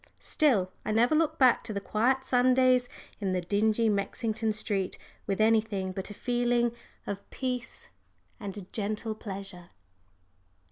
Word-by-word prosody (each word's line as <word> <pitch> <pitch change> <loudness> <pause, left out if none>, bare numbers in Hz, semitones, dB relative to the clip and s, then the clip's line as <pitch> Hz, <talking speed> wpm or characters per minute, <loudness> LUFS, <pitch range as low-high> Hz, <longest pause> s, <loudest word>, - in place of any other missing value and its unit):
Still, 220 - +2
I - - -2
never 235 +6 +3
look 315 0 +2
back 255 -3 +5
to 220 - -5
the 200 - -1
quiet 245 +6 +1
Sundays 255 0 +3 0.3
in 195 -3 -1
the 180 - 0
dingy 215 +5 +2
Mexington 220 +2 0
street 205 -3 -2 0.3
with 195 0 -1
anything 215 -3 +2
but 190 +2 -5
a 205 - -8
feeling 240 0 +1 0.3
of 200 0 -6
peace 250 -3 -4 0.5
and 200 -1 -6
gentle 215 +1 -2
pleasure. 195 -4 -8
220 Hz, 135 wpm, -29 LUFS, 200-245 Hz, 0.5 s, back